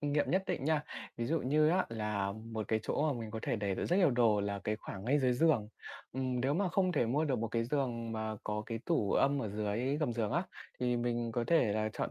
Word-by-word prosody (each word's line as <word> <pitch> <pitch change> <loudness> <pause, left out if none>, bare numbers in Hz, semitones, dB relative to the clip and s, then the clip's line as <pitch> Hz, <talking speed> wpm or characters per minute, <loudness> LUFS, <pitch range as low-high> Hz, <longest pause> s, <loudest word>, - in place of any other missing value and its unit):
kinh 145 -1 -1
nghiệm 145 - +1
nhất 185 +1 +2
định 135 - -2
nha, 155 -1 +2 0.3
ví 115 - -2
dụ 165 +4 +1
như 150 +4 +3
á 185 +3 +2
là 105 -3 -2
một 110 -1 -6
cái 110 0 +1
chỗ 150 +5 0
mà 120 - -5
mình 110 -1 -6
có 110 - -4
thể - - 0
để 100 -2 -1
được - - -2
rất 175 - +2
nhiều 180 -6 +5
đồ 115 -4 +3
là 100 0 -2
cái 105 - 0
khoảng 100 -2 -8
ngay 135 +5 +3
dưới 130 -3 +3
giường. 125 -5 +3 0.4
Ừm, 130 -1 -1
nếu 135 +3 +1
mà 190 +2 +1
không 185 0 +1
thể 120 - +2
mua 140 +7 +1
được 135 -5 0
một 115 +1 -2
cái 115 0 0
giường 120 -3 -1
mà 110 -1 -3
có 105 0 -2
cái 115 -1 -3
tủ 135 - +1
âm 140 -1 +3
ở 110 - -3
dưới 105 +6 -1
gầm 150 -5 0
giường 115 -1 -1
á, 170 +4 +2 0.4
thì 125 -1 +1
mình 120 -1 -1
có 120 0 0
thể 160 -11 +3
là 110 +1 0
chọn - - -3
120 Hz, 270 wpm, -33 LUFS, 110-145 Hz, 0.4 s, nhiều